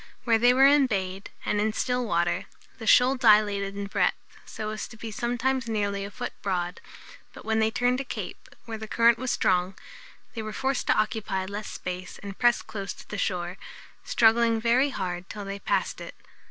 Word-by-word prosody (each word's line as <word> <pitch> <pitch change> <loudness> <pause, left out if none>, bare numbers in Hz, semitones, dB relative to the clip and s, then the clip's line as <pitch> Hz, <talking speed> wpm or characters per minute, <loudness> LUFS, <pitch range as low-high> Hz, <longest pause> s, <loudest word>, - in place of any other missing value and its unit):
Where 230 -2 +3
they 245 +2 +6
were 265 +2 +6
embayed, 200 -10 +2 0.2
and 205 - +1
in 215 0 0
still 250 +2 0
water, 175 -5 0 0.3
the 225 - -7
shoal 255 +3 +6
dilated 205 -4 +3
in 200 - -3
breadth, 200 - +1 0.3
so 215 0 -5
as 215 - -5
to 220 - -13
be 225 0 -7
sometimes 245 +1 -1
nearly 200 -2 -1
a 200 - -5
foot 245 +4 -6
broad; 180 -2 -2 0.5
but - - -12
when 220 0 +1
they 220 0 +3
turned 245 +3 +1
a - - -4
cape, - - -7 0.2
where 225 -1 -6
the 220 - -7
current 230 +1 +4
was 260 0 -3
strong, 185 -2 +1 0.6
they 225 - -4
were 215 0 -6
forced 270 +2 -1
to - - +3
occupy 210 -3 -1
less 205 +2 -5
space 180 0 -6
and 200 -1 -8
press 240 -1 +3
close 200 -3 -5
to - - -14
the 210 - -4
shore, 180 0 -2 0.4
struggling 230 0 +3
very 240 +5 +3
hard 180 -6 -4
till 205 -1 -6
they 195 0 -5
passed - - -1
it. - - -8
215 Hz, 195 wpm, -27 LUFS, 195-240 Hz, 0.6 s, they